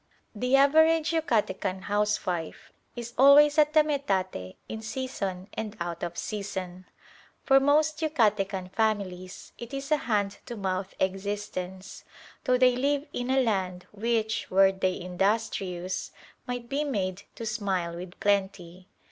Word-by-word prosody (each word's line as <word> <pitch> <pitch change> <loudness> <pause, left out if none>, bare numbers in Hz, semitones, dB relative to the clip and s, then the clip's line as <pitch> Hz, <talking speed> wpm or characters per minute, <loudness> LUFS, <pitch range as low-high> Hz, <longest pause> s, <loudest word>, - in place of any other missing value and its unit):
The 250 +5 +1
average 315 +3 +5
Yucatecan 210 - 0
housewife 205 -5 -2 0.2
is 235 0 -7
always 290 +3 +7
at 300 0 +4
the 310 - +7
metate 190 - -2
in 220 - -6
season 215 -6 -4
and 220 -1 -5
out 170 -1 -4
of 170 0 -4
season. 190 -3 -5 0.6
For 270 -1 +6
most 300 +2 +2
Yucatecan 210 - 0
families 195 -4 -2
it 240 +3 -7
is 275 +2 -6
a 305 - +5
hand 205 -6 -1
to 240 - -5
mouth 190 -1 -3
existence, 190 -1 -4 0.4
though 255 -1 +3
they 250 -1 +5
live 280 +3 0
in 245 +1 -3
a 265 0 +3
land 185 -5 -1
which, 220 +1 -1
were 195 +1 +5
they 190 -1 -1
industrious, 185 -1 -2 0.4
might 245 -1 -4
be 280 +4 -1
made 195 -9 -2
to 230 - -6
"smile 195 -6 -2
with 175 +1 -9
plenty." 190 -3 -1
205 Hz, 135 wpm, -27 LUFS, 185-255 Hz, 0.6 s, always